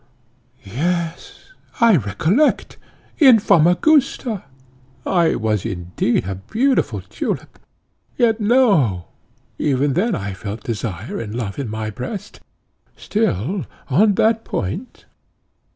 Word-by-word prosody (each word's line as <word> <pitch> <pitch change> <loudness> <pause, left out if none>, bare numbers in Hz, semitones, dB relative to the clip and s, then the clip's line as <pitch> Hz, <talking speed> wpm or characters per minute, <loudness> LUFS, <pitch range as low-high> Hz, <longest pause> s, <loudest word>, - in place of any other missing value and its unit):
Yes, 165 - -4 0.3
I 230 -4 +6
recollect, 160 - +1 0.4
in 265 -7 +8
Famagusta! 215 - +2 0.6
I 170 -4 +2
was 105 -3 -1
indeed 90 +1 -1
a 95 - -3
beautiful 230 - 0
tulip - - -5 0.6
Yet 230 -3 +2
no, 200 - +3 0.5
even 140 -1 +1
then 205 - +1
I 100 -1 -4
felt 105 +3 -7
desire 105 -4 -4
and 110 -1 -6
love 110 -3 -4
in 135 -5 -3
my 110 0 -4
breast. 130 - -7 0.6
Still, 220 - 0
still 160 - -3 0.3
on 205 +8 +4
that 225 +2 +2
point!" 180 - -5
155 Hz, 105 wpm, -20 LUFS, -, 0.6 s, in